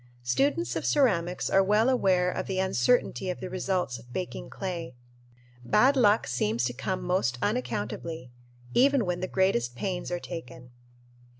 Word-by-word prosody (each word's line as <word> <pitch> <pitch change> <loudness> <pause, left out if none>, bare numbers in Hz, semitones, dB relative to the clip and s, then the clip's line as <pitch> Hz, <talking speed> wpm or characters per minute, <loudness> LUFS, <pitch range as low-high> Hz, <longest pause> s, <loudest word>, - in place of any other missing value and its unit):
Students 280 - 0
of - - -2
ceramics 180 - +1
are 195 - +4
well 210 +4 +3
aware 185 -8 +2
of - - -4
the 190 - -2
uncertainty 190 - +1
of 180 - -3
the 185 - -6
results 180 -9 -1
of 120 +2 -17
baking 180 +8 -5
clay. 170 -9 -5 0.7
Bad 245 - +4
luck 220 -4 +4
seems 120 -1 -1
to 125 0 -1
come 160 +9 -3
most 175 -9 0
unaccountably, 125 +4 -3 0.4
even 275 -3 +4
when 180 -1 -2
the 185 - -2
greatest 125 -12 +1
pains 180 +6 -3
are 175 - -1
taken. 125 -8 -9
180 Hz, 155 wpm, -28 LUFS, 125-195 Hz, 0.7 s, are